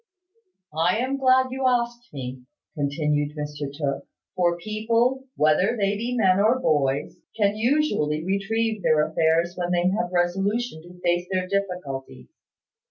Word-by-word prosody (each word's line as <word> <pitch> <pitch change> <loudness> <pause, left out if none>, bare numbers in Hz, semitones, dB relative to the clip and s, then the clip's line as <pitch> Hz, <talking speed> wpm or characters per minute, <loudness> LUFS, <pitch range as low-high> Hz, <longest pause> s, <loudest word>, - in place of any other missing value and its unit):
"I 170 +5 +2
am 260 +3 -1
glad 260 -1 +3
you 260 0 0
asked 240 -1 -1
me," 130 -2 -6 0.3
continued 145 0 -1
Mr 145 -1 -4
Tooke; 140 -1 -3 0.3
"for 175 -1 +2
people, 230 +7 0
whether 155 +9 +3
they 200 -1 +1
be 240 +4 -2
men 190 -4 +4
or 220 +5 +4
boys, 145 - 0 0.2
can 205 -1 +2
usually 215 - +1
retrieve 215 +3 -1
their 155 -3 +3
affairs 165 +2 +1
when 175 -1 -2
they 175 0 +2
have 195 -3 -1
resolution 195 +3 0
to 175 +2 -15
face 175 0 +1
their 185 -1 0
difficulties. 180 -9 -4
185 Hz, 140 wpm, -24 LUFS, 155-230 Hz, 0.3 s, men